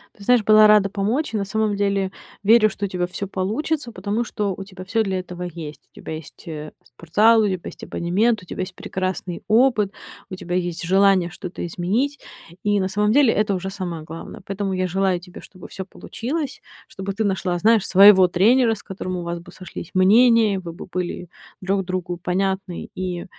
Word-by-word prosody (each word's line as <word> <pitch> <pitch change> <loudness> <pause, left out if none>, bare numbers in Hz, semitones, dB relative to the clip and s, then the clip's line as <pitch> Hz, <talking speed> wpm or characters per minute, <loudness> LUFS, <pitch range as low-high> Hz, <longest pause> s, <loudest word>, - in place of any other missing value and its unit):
Ты 205 - -14
знаешь, 245 -1 +4
была 215 0 +7
рада 210 -2 +5
помочь. 215 +9 -1
На 210 -2 0
самом 215 +1 0
деле 200 -1 0 0.3
верю, 215 +1 +6
что 200 0 -4
у - - -2
тебя 180 -1 -2
всё 200 +2 -5
получится, 235 +9 -2
потому 205 +3 -2
что 210 -3 -2
у 195 - -7
тебя 185 -1 -11
всё 225 +4 +1
для 190 -2 -2
этого 180 -1 -8
есть. 165 -4 -7
У - - -41
тебя - - -7
есть, 155 +3 -10
э, 155 -2 -6
спортзал, 210 - +3
у 210 - +2
тебя 185 -2 -1
есть - - -9
абонемент, 205 +5 0
у - - -14
тебя 180 - -5
есть 185 0 -5
прекрасный 185 -2 -4
опыт, 220 -2 +3 0.4
у 185 - -5
тебя 175 -1 -4
есть 175 -2 -2
желание 190 0 +3
что-то 180 -1 -6
изменить. 215 - -1 0.4
И 205 0 +2
на 190 - 0
самом 210 +2 +1
деле 265 -3 +5
это 210 -1 +1
уже 190 +1 -4
самое 175 -5 -5
главное. 160 +1 -9
Поэтому 195 0 -3
я 185 0 0
желаю 190 0 +1
тебе, 180 0 -12
чтобы 185 -2 -13
всё 190 - -6
получилось, 270 - -5 0.3
чтобы 195 +1 -5
ты 215 +3 -1
нашла, 190 -3 -1
знаешь, 220 +3 +3
своего 190 -1 +8
тренера, 225 +6 +3
с 205 - -13
которым 185 -2 -5
у 175 - -4
вас 170 0 -4
бы 175 +1 -14
сошлись 180 -2 -9
мнения, 215 +1 +5
вы 170 -2 -8
бы 170 - -9
были 180 -1 -4 0.3
друг 195 0 0
другу 185 -1 -3
понятны, 190 +1 -2
и 180 -2 -4
195 Hz, 200 wpm, -22 LUFS, 180-215 Hz, 0.4 s, своего